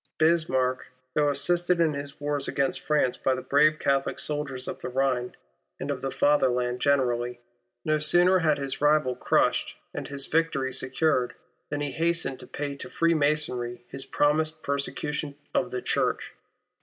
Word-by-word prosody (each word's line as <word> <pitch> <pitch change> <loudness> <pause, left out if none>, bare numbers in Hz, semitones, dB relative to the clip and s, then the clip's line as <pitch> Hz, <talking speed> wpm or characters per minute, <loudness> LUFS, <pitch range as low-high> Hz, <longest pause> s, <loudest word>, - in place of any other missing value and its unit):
Bismarck, 155 -6 +2 0.3
though 150 -1 +3
assisted 175 +5 +1
in 160 -2 +3
his 140 0 -6
wars 145 -1 -1
against 140 -1 0
France 150 -5 +1
by 130 - +1
the 130 - -6
brave 155 +2 +4
Catholic 140 -2 0
soldiers 140 -4 -3
of - - -5
the - - -5
Rhine, 125 -1 0 0.4
and 145 - -3
of 135 -3 -4
tlie 135 - -2
Fatherland 125 -4 +2
generally, 125 -3 +1 0.5
no 155 0 +2
sooner 175 +4 +5
had 155 -3 +2
his 140 -1 -3
rival 150 -4 +3
crushed, - - +1 0.2
and - - -5
his 140 -1 -3
victory 145 -5 0
secured, 130 -1 +1 0.3
than 145 0 -3
he 145 -1 -2
hastened 165 -5 -1
to - - -10
pay 145 -1 -4
to - - -7
Freemasonry 145 -7 0
his 135 - -2
promised 155 +3 +1
persecution 140 +1 -2 0.2
of - - +1
the 125 - -4
Church. - - -1
140 Hz, 155 wpm, -27 LUFS, 130-155 Hz, 0.5 s, sooner